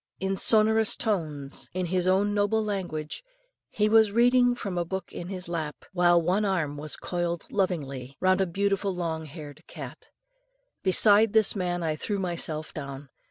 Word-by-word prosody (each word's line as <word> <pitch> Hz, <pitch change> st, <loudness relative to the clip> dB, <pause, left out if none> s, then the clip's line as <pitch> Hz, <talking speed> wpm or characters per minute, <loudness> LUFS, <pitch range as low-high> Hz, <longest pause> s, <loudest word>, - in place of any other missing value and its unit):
In 190 Hz, +1 st, -1 dB
sonorous 220 Hz, +1 st, +4 dB
tones, 155 Hz, -10 st, -1 dB
in 185 Hz, -1 st, -1 dB
his 180 Hz, +1 st, 0 dB
own 200 Hz, +2 st, +2 dB
noble 210 Hz, +2 st, +1 dB
language, 180 Hz, -, -4 dB, 0.5 s
he 210 Hz, -, +1 dB
was 220 Hz, -1 st, +5 dB
reading 245 Hz, +2 st, +4 dB
from 200 Hz, -6 st, -5 dB
a 175 Hz, -, 0 dB
book 190 Hz, +1 st, -6 dB
in 175 Hz, -, -6 dB
his 185 Hz, -2 st, -3 dB
lap, 160 Hz, -4 st, -5 dB
while 175 Hz, -1 st, +4 dB
one 180 Hz, +5 st, +1 dB
arm 175 Hz, -8 st, -1 dB
was 150 Hz, +1 st, -4 dB
coiled 175 Hz, -1 st, -3 dB
lovingly 140 Hz, -9 st, -2 dB
round 185 Hz, +1 st, +3 dB
a 190 Hz, -, +1 dB
beautiful 195 Hz, +2 st, -1 dB
long 160 Hz, -2 st, -3 dB
haired 150 Hz, -1 st, -10 dB
cat. -, -, -10 dB, 0.7 s
Beside 205 Hz, +3 st, +4 dB
this 220 Hz, -2 st, +3 dB
man 175 Hz, -2 st, -2 dB
I 155 Hz, -1 st, -1 dB
threw 205 Hz, +6 st, -3 dB
myself 165 Hz, -4 st, -3 dB
down. 140 Hz, -1 st, -7 dB
185 Hz, 160 wpm, -27 LUFS, 160-205 Hz, 0.7 s, was